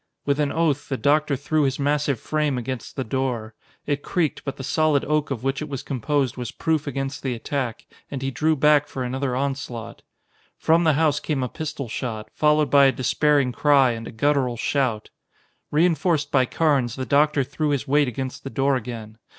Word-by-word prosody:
With 140 +1 +1
an 145 -1 +1
oath 155 -3 0
the 135 - -1
doctor 150 +1 +2
threw 150 +3 0
his 135 -2 +1
massive 145 -2 0
frame 150 -2 -1
against 125 0 -5
the 130 - -2
door. 120 -3 -2 0.3
It 145 -1 -1
creaked, 165 -2 -1
but 140 - -5
the 135 - -6
solid 155 0 +2
oak 150 0 0
of 130 -4 -4
which 135 +1 -1
it 150 - -5
was 135 -3 -5
composed 140 -1 -1
was 125 -2 -4
proof 155 -2 -1
against 135 0 -3
the 130 -3 -2
attack, 125 -1 -3 0.2
and 135 -2 -5
he 135 - -1
drew 155 +5 +1
back 150 0 +4
for 130 - -4
another 130 +1 -2
onslaught. 135 -4 -4 0.6
From 165 +1 +3
the 160 - +5
house 150 -1 +2
came 145 -5 -2
a 125 - -2
pistol 150 -3 -5
shot, 110 -1 -5
followed 150 0 +2
by 140 -1 +7
a 135 - +5
despairing 140 0 +2
cry 135 -1 +4
and 115 -1 -6
a - - -7
guttural 130 0 +1
shout. 120 -4 -1 0.6
Reinforced 160 0 +2
by 130 -2 +3
Carnes, 140 -8 +1
the 130 - -4
doctor 145 0 +3
threw 150 +3 -2
his 140 0 -1
weight 145 +1 +3
against 130 +2 -5
the 135 - -5
door 135 +1 +1
again. 115 -3 -6
140 Hz, 195 wpm, -23 LUFS, 130-150 Hz, 0.6 s, by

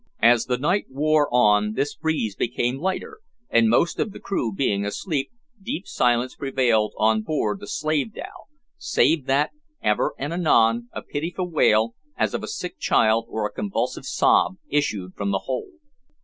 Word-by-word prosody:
As 120 0 +5
the 125 -1 0
night 170 +10 +1
wore 150 +1 +2
on 105 -3 +3
this 140 +5 -1
breeze 150 -10 -2
became 120 +2 -1
lighter, 310 - -3 0.3
and, 115 -1 +4
most 145 +9 +2
of 210 - -1
the - - -9
crew 155 - -2
being 100 -2 0
asleep, 140 - -2 0.3
deep 185 -1 -4
silence 120 +1 +1
prevailed 120 -6 +1
on 110 0 +3
board 155 - -1
the 205 - -10
slave 155 +2 -1
dhow, - - -9 0.3
save 165 - +2
that, 140 +3 +2 0.3
ever 105 - +1
and 145 +4 -3
anon, 120 -9 +3
a - - -7
pitiful 175 +5 -3
wail, 115 -7 +3 0.2
as 110 -2 0
of - - -2
a - - -6
sick - - -6
child, 115 +1 +2
or 110 -2 -2
a 105 - -4
convulsive 100 -2 -3
sob, - - +3 0.2
issued 105 -11 -1
from 100 -1 -3
the 95 -1 0
hold. 135 - -4
125 Hz, 165 wpm, -23 LUFS, 110-155 Hz, 0.3 s, As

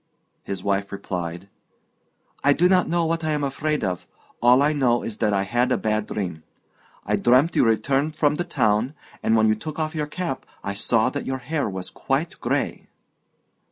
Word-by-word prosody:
His 100 - -5
wife 100 0 0
replied: 90 -2 -5 1.0
"I 145 - +5
do 175 +5 +4
not 185 0 +3
know 170 0 +1
what 165 0 -1
I 155 -1 0
am 150 -1 -1
afraid 150 +1 -1
of; 90 -3 -2 0.3
all 125 +3 +6
I 150 +1 +3
know 125 -5 +2
is 110 - -5
that 105 -2 +1
I 100 -1 +1
had 120 +5 +1
a - - +3
bad 110 -1 -1
dream. 90 -6 -4 0.6
I - - +1
dreamt 130 +7 +4
you - - +5
returned 135 +6 +1
from 150 -1 +3
the 175 - -1
town, 120 -4 +1 0.3
and 110 - +2
when 110 0 +4
you 110 - +4
took 145 +8 -6
off 155 0 -2
your 150 -2 -2
cap 165 -3 -4 0.2
I 100 - -2
saw 110 +2 +1
that 145 - -4
your 130 0 -1
hair 140 0 -2
was 95 -1 -6
quite - - -2
grey." - - -1
125 Hz, 190 wpm, -24 LUFS, 105-150 Hz, 1.0 s, all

